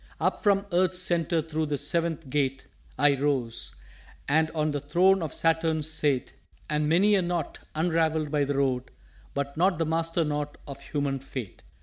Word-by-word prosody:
"_Up - - +1
from 200 -1 +2
Earth's 180 +1 +2
Centre 170 -2 +1
thro' 160 0 -2
the 145 -1 -1
Seventh 165 0 0
Gate 135 -1 -1 0.3
I 145 +2 +5
rose, 125 - -2 0.5
and 155 +2 +3
on 155 -1 -1
the 145 - -1
throne 180 +7 +3
of 160 - -3
Saturn 160 -1 +1
sate, 150 -4 -1 0.3
And 150 0 0
many 195 +6 +4
a 195 - +4
Knot 175 -3 -3 0.2
unravelled 160 -2 +1
by 145 -2 +2
the 140 0 -2
Road 130 -2 0 0.5
But 140 +1 -3
not 185 +1 +3
the 165 - 0
Master 165 +1 0
knot 150 -1 -3
of 140 - -8
Human 140 -2 -2
fate. 130 -6 -7
155 Hz, 170 wpm, -27 LUFS, 140-165 Hz, 0.5 s, I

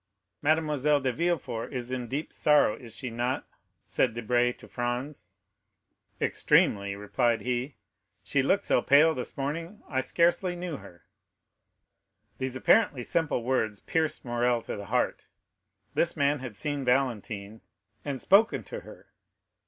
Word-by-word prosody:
"Mademoiselle 150 -2 +2
de 130 -2 -1
Villefort 140 -8 -2
is 125 -1 -5
in 125 -2 -3
deep 140 +6 -4
sorrow, 150 -7 +4
is 115 -3 -10
she 125 -3 -4
not?" 120 +3 -2 0.4
said - - +1
Debray 120 +1 +2
to - - -14
Franz. 120 -4 -4 0.9
"Extremely," 100 -1 +2
replied 115 +3 0
he; 125 +3 -2 0.5
"she 140 - +1
looked 195 +9 +1
so - - +3
pale 155 +3 +5
this 125 -3 -6
morning, 165 - -4
I 130 -2 0
scarcely 175 +5 +2
knew 175 -4 -4
her." 85 -8 -15 1.3
These 130 -1 -3
apparently 140 - +3
simple 155 -4 0
words 115 -5 0
pierced 160 -3 -1
Morrel 120 -1 +1
to - - -5
the 100 - -7
heart. 125 +3 -1 0.7
This 170 -1 +1
man 145 0 +2
had 125 -5 -7
seen 140 +7 -3
Valentine, 115 -5 -1 0.4
and 140 -2 -3
spoken 215 +4 +4
to - - -7
her! - - -14
130 Hz, 135 wpm, -28 LUFS, 120-150 Hz, 1.3 s, pale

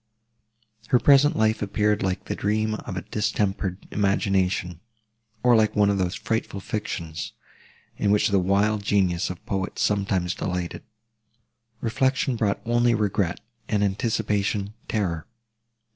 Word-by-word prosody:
Her 125 - +4
present 140 +3 +5
life 110 0 +2
appeared 105 +1 +1
like 95 -1 -2
the - - -3
dream 110 +1 0
of 100 -3 -5
a 90 - -4
distempered 100 -3 -1
imagination, 95 -3 0 0.6
or 125 -1 +6
like 110 -1 +3
one 105 -1 +4
of 100 - 0
those 90 0 0
frightful 110 -3 -2
fictions, 85 -5 -4 0.6
in 100 - +1
which 105 +1 +3
the 100 -1 +3
wild 100 +3 +2
genius 95 -3 +1
of 90 - -4
the - - -36
poets 95 -2 -2
sometimes 95 -3 +1
delighted. 90 -1 -3 1.0
Reflection 130 +3 +1
brought 105 -3 0
only 120 0 +3
regret, 100 -4 0 0.3
and 105 -1 +1
anticipation 105 -1 0
terror. 90 -7 -2
100 Hz, 130 wpm, -25 LUFS, 95-110 Hz, 1.0 s, or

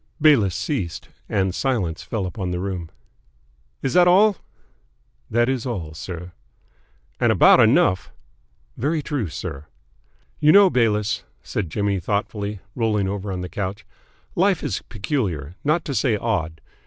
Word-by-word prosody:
'" - - -42
Bayliss 130 - +4
ceased, 95 - -3 0.2
and 95 -3 0
silence 95 -10 -1
fell 110 -4 -3
upon 90 0 -4
the 90 0 -2
room. 90 -3 -4 0.9
"Is 130 - -1
that 180 -1 +6
all?" 200 +2 +5 0.9
"That 120 +1 +2
is 130 -3 -1
all, 90 -12 -4
sir." 90 +2 -7 0.9
"And - - +3
about - - +6
enough." 90 - +3 0.6
"Very 150 +5 -1
true, 140 - -2
sir." 75 -1 -6 0.7
"You 150 0 +5
know, 200 -2 +7
Bayliss," 110 -3 +1 0.2
said 85 - -3
Jimmy 100 +2 0
thoughtfully, 100 +1 -3
rolling 110 -5 0
over 100 0 -3
on 90 -1 -3
the 90 - -4
couch, 100 +2 -5 0.5
"life - - +2
is - - -2
peculiar, 95 - -2
not 155 +3 +1
to 140 - -3
say 125 -5 +1
odd. 90 -8 -2
105 Hz, 140 wpm, -22 LUFS, 90-130 Hz, 0.9 s, know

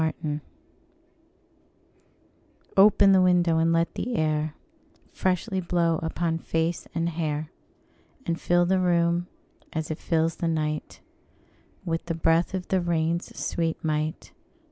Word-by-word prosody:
Nelson] 155 -1 -2 2.3
OPEN 200 0 +6
the 190 -1 +6
window, 175 -3 +3
and 165 0 +3
let 165 0 +1
the 245 0 -3
air 155 -3 0 0.6
Freshly 185 +1 -1
blow 170 -2 +1
upon 165 0 -1
face 165 +1 -2
and 165 0 0
hair, 155 -2 -3 0.7
And 165 0 -2
fill 175 0 +3
the 190 +1 +2
room, 175 -1 +2 0.5
as 160 -1 -3
it 155 - -4
fills 165 0 0
the 170 - -1
night, 155 -2 -2 0.8
With 165 0 -2
the 165 - -1
breath 165 +2 +2
of 180 -1 -5
the 190 -1 +2
rain's 170 0 -1
sweet 165 -1 -1
might. 155 0 -2
165 Hz, 125 wpm, -26 LUFS, 160-175 Hz, 2.3 s, OPEN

